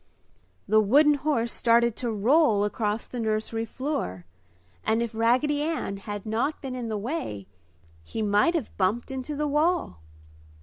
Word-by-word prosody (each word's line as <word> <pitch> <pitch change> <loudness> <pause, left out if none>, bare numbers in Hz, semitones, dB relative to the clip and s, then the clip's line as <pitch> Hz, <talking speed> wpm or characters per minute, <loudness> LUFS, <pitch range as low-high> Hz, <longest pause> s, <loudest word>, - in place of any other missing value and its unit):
The 215 +1 +5
wooden 290 +8 +5
horse 275 -5 0
started 235 -1 +3
to 245 - -2
roll 220 0 +3
across 210 +1 -1
the 245 - -6
nursery 220 0 -1
floor 225 - -4 0.6
and 220 +1 +1
if 235 -1 -2
Raggedy 255 +6 +2
Ann 305 -10 -2
had 205 +1 -6
not 235 +8 -1
been 265 -2 -6
in 240 -2 -4
the 215 - -2
way, 210 - -4 0.6
he 220 - -4
might 210 +11 +3
have 300 -9 -3
bumped 210 +7 0
into 265 +3 -4
the 300 +1 -1
wall. 300 - +1
230 Hz, 150 wpm, -26 LUFS, 210-290 Hz, 0.6 s, The